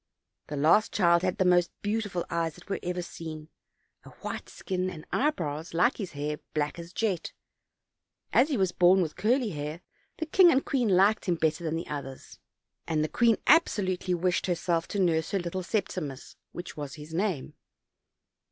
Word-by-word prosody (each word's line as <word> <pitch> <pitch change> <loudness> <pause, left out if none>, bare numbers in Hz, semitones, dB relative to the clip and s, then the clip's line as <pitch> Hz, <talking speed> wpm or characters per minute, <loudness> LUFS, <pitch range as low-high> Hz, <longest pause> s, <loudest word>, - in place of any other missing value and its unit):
The 150 - -5
last 160 +9 +4
child 170 -3 +4
had 185 -1 -1
the 190 - +2
most 175 -1 +4
beautiful 205 -4 -1
eyes 165 -2 -1
that 180 - -16
were 195 - -2
ever 180 0 -3
seen, 160 -2 -8 0.5
a - - -12
white - - -7
skin, 185 -1 -3
and 160 -4 -9
eye 295 - +3
brows, 160 - -5
like 210 +10 +3
his 195 -5 -5
hair, 150 +1 -3 0.2
black 150 +2 -1
as 170 0 -9
jet; 190 -4 -2 1.0
as 270 +5 +5
he 280 - 0
was 190 -3 +2
born 180 +1 +5
with 155 - -5
curly 240 +2 +1
hair 150 +2 -5 0.4
the 320 - -2
king 350 +2 +6
and 270 -3 +2
queen 250 -5 +1
liked 195 +3 +4
him 180 -4 +1
better 160 +1 0
than 160 -1 -1
the 165 - -3
others, 135 -2 -7 0.5
and 155 -2 +1
the - - 0
queen 235 -2 +3
absolutely 190 - +3
wished 180 +1 0
herself 170 -1 0
to - - -4
nurse 165 -4 +2
her 195 - 0
little 175 +1 -3
Septimus, 175 - -3 0.2
which 175 - -8
was 145 -2 -6
his 150 +1 -10
name. 180 -5 -1
175 Hz, 180 wpm, -28 LUFS, 160-200 Hz, 1.0 s, king